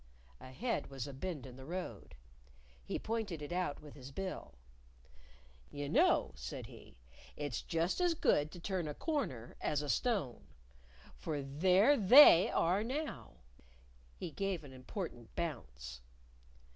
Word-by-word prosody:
Ahead 230 Hz, -, -3 dB
was 135 Hz, -2 st, -5 dB
a 140 Hz, -, -7 dB
bend 150 Hz, 0 st, -5 dB
in 125 Hz, -1 st, -10 dB
the 130 Hz, -, -10 dB
road. 180 Hz, +2 st, -6 dB, 0.7 s
He -, -, -3 dB
pointed 220 Hz, -7 st, -3 dB
it 145 Hz, -, -7 dB
out 180 Hz, -4 st, -1 dB
with 150 Hz, -, -11 dB
his 135 Hz, -2 st, -10 dB
bill. 185 Hz, -, -5 dB, 1.1 s
"You 145 Hz, 0 st, -5 dB
know," -, -, +4 dB
said 65 Hz, -2 st, -6 dB
he, -, -, -14 dB, 0.4 s
"it's 145 Hz, -5 st, -3 dB
just 165 Hz, -, 0 dB
as 350 Hz, -2 st, +3 dB
good 150 Hz, -, +2 dB
to 175 Hz, -, -9 dB
turn 180 Hz, -2 st, -2 dB
a 150 Hz, -, -4 dB
corner 190 Hz, -, -3 dB
as 150 Hz, -1 st, 0 dB
a 145 Hz, -, -4 dB
stone. 170 Hz, -, 0 dB, 0.7 s
For 150 Hz, -4 st, -3 dB
there 185 Hz, -, +4 dB
They 210 Hz, -, +9 dB
are 185 Hz, +5 st, +2 dB
now!" 255 Hz, -, -5 dB, 0.8 s
He 170 Hz, -, -5 dB
gave 195 Hz, -2 st, -2 dB
an 135 Hz, -2 st, -11 dB
important 130 Hz, -, -7 dB
bounce. 65 Hz, -, -5 dB
155 Hz, 140 wpm, -35 LUFS, 130-195 Hz, 1.1 s, They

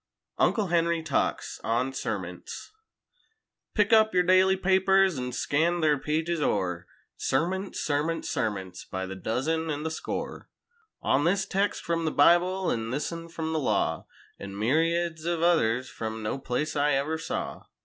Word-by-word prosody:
50 -, -, +6 dB
UNCLE 215 Hz, -4 st, 0 dB
HENRY 170 Hz, -1 st, +1 dB
TALKS -, -, -1 dB
ON 125 Hz, +4 st, 0 dB
SERMONTS -, -, -5 dB, 1.0 s
Pick 210 Hz, +1 st, +3 dB
up 220 Hz, -3 st, +5 dB
yer 180 Hz, -, +5 dB
daily 185 Hz, +1 st, +4 dB
papers 190 Hz, -3 st, +3 dB
an' 125 Hz, 0 st, -3 dB
scan 165 Hz, +7 st, +1 dB
their 150 Hz, -2 st, +3 dB
pages 160 Hz, +3 st, -1 dB
o'er— 90 Hz, -9 st, -1 dB, 0.3 s
Sermonts, 185 Hz, +8 st, -1 dB
sermonts, 150 Hz, +3 st, -1 dB
sermonts—by 95 Hz, -, -3 dB
the 95 Hz, +1 st, -6 dB
dozen 145 Hz, -, -1 dB
an' 150 Hz, -1 st, -2 dB
the 160 Hz, -, -2 dB
score: 160 Hz, -, -5 dB, 0.5 s
On 140 Hz, -, +2 dB
this 195 Hz, +4 st, +2 dB
text 200 Hz, +1 st, -1 dB
frum 165 Hz, -1 st, -1 dB
the 155 Hz, -, +1 dB
Bible 180 Hz, +5 st, +4 dB
an' 115 Hz, 0 st, -2 dB
this 140 Hz, +6 st, -2 dB
un 165 Hz, 0 st, -7 dB
frum 160 Hz, -1 st, -4 dB
the 160 Hz, -, +1 dB
law, 135 Hz, -, 0 dB, 0.3 s
An' 100 Hz, 0 st, -7 dB
myriads 165 Hz, +7 st, +1 dB
ov 170 Hz, -1 st, 0 dB
others 130 Hz, -8 st, +2 dB
frum 110 Hz, 0 st, -5 dB
no 105 Hz, +5 st, -2 dB
place 135 Hz, +4 st, -2 dB
I 145 Hz, 0 st, +2 dB
ever 150 Hz, +4 st, 0 dB
saw. -, -, -4 dB
160 Hz, 155 wpm, -27 LUFS, 130-175 Hz, 1.0 s, 50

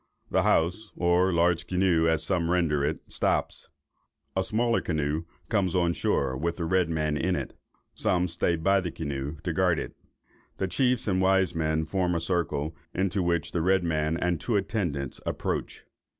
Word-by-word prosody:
The -, -, +3 dB
house 90 Hz, +6 st, +1 dB
(or 90 Hz, +2 st, +3 dB
large 85 Hz, 0 st, +2 dB
canoe, 90 Hz, -3 st, +2 dB
as 80 Hz, -1 st, +2 dB
some 85 Hz, -4 st, 0 dB
render 80 Hz, -5 st, +2 dB
it) 75 Hz, +2 st, -1 dB
stops. -, -, 0 dB, 0.7 s
A 95 Hz, -, +1 dB
smaller 115 Hz, +4 st, +1 dB
canoe 75 Hz, 0 st, -1 dB, 0.2 s
comes 95 Hz, -5 st, +1 dB
on 85 Hz, -2 st, +2 dB
shore, 65 Hz, -5 st, 0 dB
with 85 Hz, +5 st, -2 dB
the 85 Hz, -, -2 dB
red 90 Hz, 0 st, +2 dB
man 75 Hz, -2 st, 0 dB
in 90 Hz, +4 st, 0 dB
it; -, -, -4 dB, 0.4 s
some 90 Hz, 0 st, +1 dB
stay 85 Hz, 0 st, +1 dB
by 95 Hz, +4 st, +2 dB
his 85 Hz, -3 st, -5 dB
canoe, 70 Hz, -1 st, -4 dB
to 85 Hz, -, -1 dB
guard 90 Hz, -1 st, +2 dB
it. -, -, -5 dB, 0.6 s
The 95 Hz, -, -1 dB
chiefs 125 Hz, +6 st, +1 dB
and 95 Hz, -2 st, +2 dB
wise 95 Hz, -2 st, +3 dB
men 80 Hz, -1 st, 0 dB
form 90 Hz, +1 st, 0 dB
a -, -, +1 dB
circle, 80 Hz, -3 st, -1 dB, 0.2 s
into 95 Hz, +1 st, 0 dB
which 85 Hz, -2 st, 0 dB
the 85 Hz, -, -1 dB
red 95 Hz, +2 st, +3 dB
man 80 Hz, -1 st, 0 dB
and 85 Hz, -2 st, -1 dB
two 120 Hz, -, -1 dB
attendants 85 Hz, -, -2 dB
approach. -, -, -3 dB
85 Hz, 175 wpm, -27 LUFS, 80-95 Hz, 0.7 s, The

